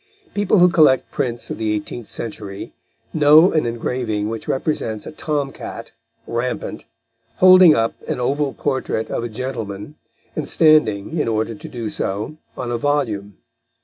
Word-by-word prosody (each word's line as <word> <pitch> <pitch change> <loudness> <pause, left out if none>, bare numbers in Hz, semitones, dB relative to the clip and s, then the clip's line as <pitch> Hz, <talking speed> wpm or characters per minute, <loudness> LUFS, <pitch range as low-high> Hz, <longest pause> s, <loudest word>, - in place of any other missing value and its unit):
People 205 0 +2
who 180 0 +7
collect 155 -6 +4
prints 120 -2 -3
of - - -5
the 110 -1 0
eighteenth 105 +2 -5
century 105 -3 -6 0.4
know 155 +4 +6
an 155 -6 +1
engraving 115 -2 -2
which 115 0 -6
represents 130 -6 -2
a - - -7
tom 145 -3 -2
cat, - - -8 0.3
rampant, 120 +2 -3 0.5
holding 185 -1 +8
up 115 0 +1
an - - -2
oval 140 +3 0
portrait 130 -6 -2
of - - -2
a 120 - -3
gentleman 115 -1 -5 0.4
and 155 - -3
standing, 155 -3 +3
in 150 - 0
order 110 0 -1
to 105 - -10
do 115 -3 -5
so, 105 +10 -3 0.2
on 125 -2 -4
a 120 - -1
volume. 115 -8 -1
125 Hz, 150 wpm, -20 LUFS, 110-150 Hz, 0.5 s, holding